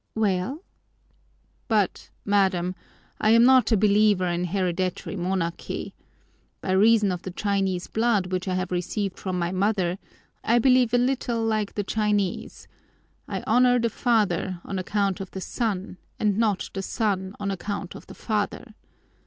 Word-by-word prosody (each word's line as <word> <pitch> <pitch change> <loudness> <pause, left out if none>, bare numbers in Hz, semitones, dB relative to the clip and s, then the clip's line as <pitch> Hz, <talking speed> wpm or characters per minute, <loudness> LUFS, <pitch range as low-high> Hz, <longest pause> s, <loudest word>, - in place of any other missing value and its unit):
"Well?" 215 - -1 1.0
"But, 210 -6 0 0.2
madam, 190 -3 +2 0.5
I 215 - +2
am 230 +1 +6
not 260 0 +5
a 220 - +5
believer 205 -2 +3
in 175 0 -1
hereditary 185 +1 -2
monarchy. 175 -2 -3 0.7
By 185 - -3
reason 210 +1 +4
of 180 -1 -4
the 190 - -6
Chinese 190 -1 -1
blood 220 -5 0
which 185 +1 -2
I 185 - 0
have 185 0 -2
received 185 +2 -2
from 185 -2 -3
my 170 0 -1
mother 190 -2 0 0.4
I 235 - +3
believe 250 -1 +4
a - - +5
little 245 -2 0
like 215 -2 -1
the 205 - -1
Chinese: 205 -2 -1 0.6
I - - -4
honor 245 +2 +4
the 230 -1 0
father 200 -7 0
on 195 - -3
account 200 +1 -1
of 190 - -6
the 190 - -7
son 195 -4 -3 0.2
and 210 -2 +2
not 215 -3 0
the 195 - -3
son 195 -1 -2
on 200 -1 -2
account 195 0 -4
of - - -12
the - - -11
father. 215 +1 -3
200 Hz, 155 wpm, -25 LUFS, 185-220 Hz, 1.0 s, am